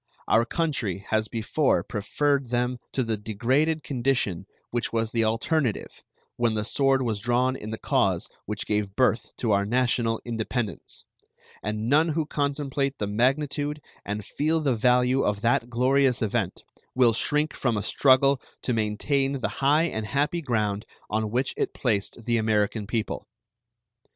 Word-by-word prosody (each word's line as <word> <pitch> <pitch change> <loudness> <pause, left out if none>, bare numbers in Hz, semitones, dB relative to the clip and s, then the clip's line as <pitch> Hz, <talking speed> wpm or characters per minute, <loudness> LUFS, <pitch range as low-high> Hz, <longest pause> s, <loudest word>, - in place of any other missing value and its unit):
Our 115 +1 +4
country 120 - -2
has 110 0 +1
before 120 +6 +1
preferred 135 +5 -1
them 125 +1 0
to 130 - +1
the 115 -2 -1
degraded 130 +10 0
condition 120 -8 -1 0.2
which 120 -1 -2
was 115 -1 -1
the 115 -1 +1
alternative 115 +3 -1 0.4
when 120 -2 +1
the 105 0 -1
sword 135 +2 +2
was 110 -4 -1
drawn 125 +3 +1
in 110 - -7
the 110 - -4
cause - - +1 0.2
which 105 0 -3
gave 105 -2 -1
birth 125 -2 +1
to 115 - 0
our 100 0 +3
national 115 0 +1
independence, 115 -1 -4 0.6
and 105 +1 -3
none 155 +5 +4
who 160 0 0
contemplate 140 -2 -1
the 105 - -2
magnitude 145 +7 0 0.2
and 105 0 -4
feel 155 +2 0
the 140 -5 +1
value 125 +3 +3
of 105 -1 0
that 120 +1 +1
glorious 130 +1 +2
event 105 -3 -2 0.3
will 125 -3 +5
shrink 150 +6 0
from 120 -4 0
a 105 - -2
struggle 135 0 +4 0.2
to 125 - 0
maintain 135 +6 0
the 130 -7 -2
high 145 +4 +4
and 110 -10 -2
happy 145 +6 0
ground 105 -6 -1 0.3
on 110 0 0
which 125 +4 0
it - - -2
placed 110 -1 -1
the 120 -1 +2
American 110 -1 0
people. 110 0 -3
120 Hz, 155 wpm, -26 LUFS, 110-135 Hz, 0.6 s, will